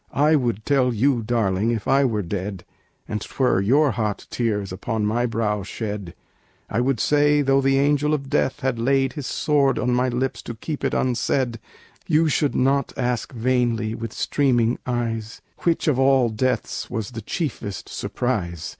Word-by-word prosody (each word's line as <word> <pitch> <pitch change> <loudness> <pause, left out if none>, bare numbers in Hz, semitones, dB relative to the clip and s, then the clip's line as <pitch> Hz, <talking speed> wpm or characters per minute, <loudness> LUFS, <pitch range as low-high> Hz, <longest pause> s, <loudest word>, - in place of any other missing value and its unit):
"I 150 +2 +3
would 120 -6 -1
tell 135 -3 +3
you, 125 +2 +2
darling, 110 -2 0
if 115 -3 -2
I 140 0 +4
were 110 -5 0
dead, 95 0 -4 0.4
And 105 - -3
'twere 125 -8 +1
your 140 +8 +3
hot 105 -2 -2
tears 105 -5 -1
upon 105 +3 -2
my 120 +4 +1
brow 110 -2 -1
shed, 100 -2 -5 0.6
"I 115 - +1
would 130 -2 0
say, 145 +1 +3
though 135 0 +3
the 135 0 +3
Angel 145 +1 +2
of 140 -2 -6
Death 135 - 0
had 130 -3 -1
laid 135 +2 +2
His 145 -4 -5
sword 140 -3 +2
on 125 - 0
my 125 +1 +2
lips 125 +1 -2
to 120 - -7
keep 145 +6 -5
it - - 0
unsaid, 125 -1 0 0.5
"You 160 0 +3
should 145 -1 +1
not 135 +1 +1
ask 125 -2 -1
vainly, 120 -2 0
with 115 -1 -5
streaming 120 -4 +1
eyes, 115 -3 -2 0.2
Which 170 -1 0
of 140 -4 +2
all 135 -2 +4
deaths 125 +4 -2
was 110 -1 -4
the 115 -2 -6
chiefest 115 - -4
surprise. 85 -10 -3
120 Hz, 170 wpm, -23 LUFS, 110-135 Hz, 0.6 s, I